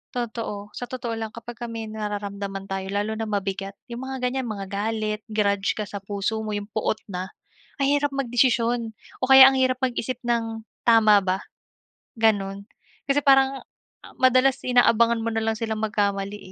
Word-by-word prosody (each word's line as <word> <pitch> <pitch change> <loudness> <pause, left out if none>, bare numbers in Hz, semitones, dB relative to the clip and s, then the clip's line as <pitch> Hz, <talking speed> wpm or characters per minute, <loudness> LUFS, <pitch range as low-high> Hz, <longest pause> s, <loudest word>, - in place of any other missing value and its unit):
totoo, 220 -4 -4
sa 245 - -6
totoo 245 -2 -5
lang 225 - -3
kapagka 235 +1 -7
may 225 -1 -6
nararamdaman 200 -2 -5
tayo 190 0 -3
lalo 205 +2 -1
na 225 - -2
mabigat, 195 -1 -3 0.2
'yong 235 - -5
mga 265 0 -4
ganyan 260 -1 -3
mga 200 -3 -5
galit, 215 +1 -2
grudge 200 -2 +1
ka 215 - -2
sa 200 - -6
puso 200 +2 -3
mo, 215 - -3
'yong 205 0 -5
poot 215 0 -1
na 185 0 -4 0.6
ang 275 - +3
hirap 290 0 +2
magdesisyon 240 -3 +1 0.3
o - - +3
kaya 265 0 +10
ang 270 - -1
hirap 255 -1 +2
mag-isip 255 -1 -1
ng 230 -2 -1 0.2
tama 220 -3 +6
ba, 185 0 0 0.8
ganun. 200 -3 +1 0.4
Kasi 275 - +4
parang 270 -1 +4 0.6
madalas 255 +1 +4
inaabangan 235 -2 +4
mo 230 - 0
na 225 - 0
lang 225 - +1
silang 220 -1 -3
magkamali 200 -1 -1
220 Hz, 165 wpm, -24 LUFS, 205-245 Hz, 0.8 s, kaya